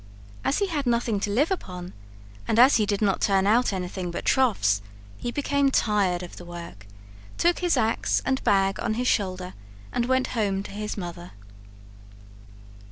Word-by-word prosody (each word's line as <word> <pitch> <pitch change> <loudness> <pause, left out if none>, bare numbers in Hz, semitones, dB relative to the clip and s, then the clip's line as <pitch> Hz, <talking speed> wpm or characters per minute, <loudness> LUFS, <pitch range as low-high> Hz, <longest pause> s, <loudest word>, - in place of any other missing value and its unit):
As 275 - +1
he 405 - +2
had 300 -8 -2
nothing 235 -3 +1
to 205 - -2
live 275 - +1
upon, 180 - -5 0.5
and 220 - +1
as 255 +4 +7
he 210 -2 +1
did 205 0 0
not 195 -2 +1
turn 195 -1 +3
out 230 +4 +3
anything 185 -1 -4
but 170 - -5
troughs, 150 - +2 0.4
he 240 - -3
became 280 0 +1
tired 200 -8 +1
of 175 - -10
the - - -9
work, 170 - -10 0.5
took 345 0 +2
his 355 -1 +1
ax 225 +1 +1
and 265 0 0
bag 195 -1 +2
on 215 - -1
his 250 +2 -1
shoulder, 185 -4 -1 0.4
and 240 0 0
went 260 0 +1
home 200 -4 0
to - - -9
his 210 +1 -5
mother. 175 -2 -7
205 Hz, 170 wpm, -25 LUFS, 185-250 Hz, 0.5 s, as